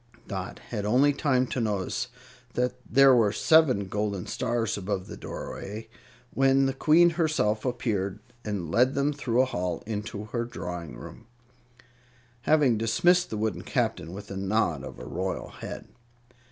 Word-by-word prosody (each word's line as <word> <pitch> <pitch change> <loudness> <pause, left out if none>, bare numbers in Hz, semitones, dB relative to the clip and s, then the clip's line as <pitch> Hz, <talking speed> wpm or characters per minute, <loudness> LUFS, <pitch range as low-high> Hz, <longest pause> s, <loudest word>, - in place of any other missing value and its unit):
Dot 95 -3 -5
had 105 -4 -3
only 130 +7 +4
time 130 -3 +2
to 125 - -3
notice 105 0 -1 0.5
that 125 0 +1 0.2
there 135 +2 +7
were 110 -4 +4
seven 135 -6 +4
golden 100 -1 -2
stars 115 -3 -1
above 95 -1 -3
the - - -8
doorway, 110 +3 -7 0.4
when 135 0 +4
the 135 - 0
Queen 165 +5 +5
herself 155 -10 0
appeared 110 -6 -1 0.3
and 95 -6 -3
led 130 - +3
them 140 +2 +1
through 130 -3 +1
a - - +2
hall 90 -8 -3
into 105 -1 -4
her 115 +2 -2
drawing 90 - -6
room, - - -11 1.2
having 145 -8 +4
dismissed 175 +11 +3
the 110 - -3
wooden 110 -2 -1
Captain 85 -2 -1
with 100 +3 -9
a 95 - -4
nod 95 -7 0
of - - -8
her - - -9
royal - - -3
head. - - -8
110 Hz, 155 wpm, -27 LUFS, 100-135 Hz, 1.2 s, there